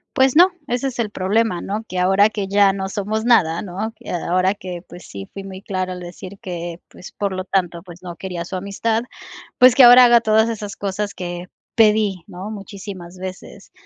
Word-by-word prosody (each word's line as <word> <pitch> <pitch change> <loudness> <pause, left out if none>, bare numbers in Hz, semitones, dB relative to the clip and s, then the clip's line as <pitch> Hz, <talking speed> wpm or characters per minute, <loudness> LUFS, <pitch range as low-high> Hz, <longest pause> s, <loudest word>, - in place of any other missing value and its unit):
Pues 265 0 +3
no, 350 +3 +8 0.2
ese 245 +3 -1
es 245 -2 -6
el 220 - 0
problema, 205 0 0
¿no? 215 +3 -4
Que 185 - -6
ahora 195 +3 +4
que 205 -3 -4
ya 200 -1 +4
no 190 -1 -4
somos 210 +2 -2
nada, 180 -9 +3
¿no? 205 +4 -5
Que - - -13
ahora 185 +2 +1
que, 180 -3 -7
pues 180 - -11
sí 100 -1 -8
fui 195 -1 -8
muy 190 0 -9
clara 185 -2 -3
al 180 - -8
decir 180 +2 -9
que, 175 -1 -6
pues, 180 - -13
por 200 -1 -2
lo 185 0 -4
tanto, 175 -3 -1
pues 175 -1 -14
no 175 -1 -8
quería 180 -3 -5
su 185 +2 -5
amistad, 220 +4 -1 0.5
pues 255 0 +7
que 260 - +6
ahora 245 +1 +10
haga 240 0 +6
todas 220 0 +3
esas 210 -2 -5
cosas 205 +1 -3
que 175 -1 -6 0.3
pedí, 210 -4 +3
¿no? 185 +4 -8
Muchísimas 195 -3 -9
veces. 185 0 -9
195 Hz, 205 wpm, -20 LUFS, 180-220 Hz, 0.5 s, ahora